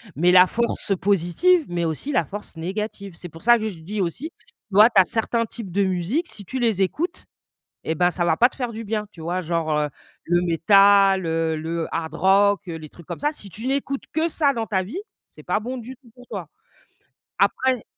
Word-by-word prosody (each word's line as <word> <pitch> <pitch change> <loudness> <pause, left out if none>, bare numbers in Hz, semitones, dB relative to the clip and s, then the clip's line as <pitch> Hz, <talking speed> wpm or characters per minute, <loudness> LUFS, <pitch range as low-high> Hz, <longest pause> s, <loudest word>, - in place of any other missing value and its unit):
Mais 175 +4 +3
la 180 0 +8
force 230 -1 -1
positive, 200 - +2
mais 175 -1 -2
aussi 165 - -3
la 170 - +1
force 205 0 -9
négative. 195 +2 -5
C'est 175 - -9
pour 165 +1 -13
ça 240 +1 +6
que 220 -1 -3
je 180 -5 -10
dis 200 +6 -4
aussi, 240 - -3
tu - - -31 0.3
vois, 210 +2 +9
tu 195 - +7
as - - +1
certains 230 +2 -1
types 220 -6 -7
de 200 +3 +1
musique, 190 - -1
si 205 - -9
tu 260 +7 -4
les 225 -6 +2
écoutes, 335 - -3 0.6
et 160 - -1
ben, 175 +2 +2
ça 180 0 -2
va 160 -2 +2
pas 245 - +6
te - - -16
faire 245 -3 -3
du 225 0 -7
bien, 210 0 -2
tu 170 - -16
vois? 175 +3 -2
Genre, 165 -1 -2
heu, 150 0 0 0.3
le 175 0 +1
métal, 195 +2 +5
heu, 160 -1 0
le 165 +1 -3
hard 160 -1 -3
rock, 195 +1 +4
heu, 165 - -4
les 155 -1 -9
trucs 170 +2 -16
comme - - -6
ça. 295 +1 0
Si 205 -9 -10
tu 220 +8 -5
n'écoutes 275 0 -2
que 320 +2 +1
ça 295 -3 +2
dans 230 -3 -2
ta 190 -4 0
vie, 230 - -6 0.3
c'est - - -16
pas - - 0
bon 250 +4 -5
du 250 +2 -9
tout 245 -2 -21
pour 250 -1 -15
toi. - - -6 0.9
Après 260 -3 +1
200 Hz, 225 wpm, -23 LUFS, 170-235 Hz, 0.9 s, vois